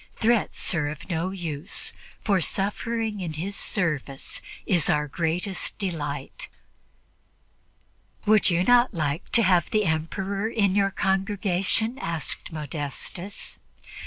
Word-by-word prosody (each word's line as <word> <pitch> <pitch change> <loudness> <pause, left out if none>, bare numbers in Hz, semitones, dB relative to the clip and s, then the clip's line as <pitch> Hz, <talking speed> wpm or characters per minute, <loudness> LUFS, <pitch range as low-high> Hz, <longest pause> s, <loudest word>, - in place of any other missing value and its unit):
Threats 230 -3 +2
are 150 -4 +1
of 150 +5 -6
no 170 +2 0
use, 170 -4 -1 0.3
for 195 -4 +3
suffering 215 +4 -1
in 170 -4 -3
His 185 +6 -3
service 150 -8 -1 0.2
is 175 -6 +3
our 150 0 +2
greatest 175 +5 -1
delight." 150 -8 -4 1.8
"Would 215 -1 +5
you 175 0 +3
not 245 0 +5
like 155 +2 -1
to 230 - +6
have 180 -3 +4
the 215 -1 +2
Emperor 195 +6 -1
in 200 -5 +2
your 200 0 +3
congregation?" 195 +4 0
asked 165 0 -3
Modestus. 155 +5 -5
185 Hz, 115 wpm, -26 LUFS, 160-205 Hz, 1.8 s, to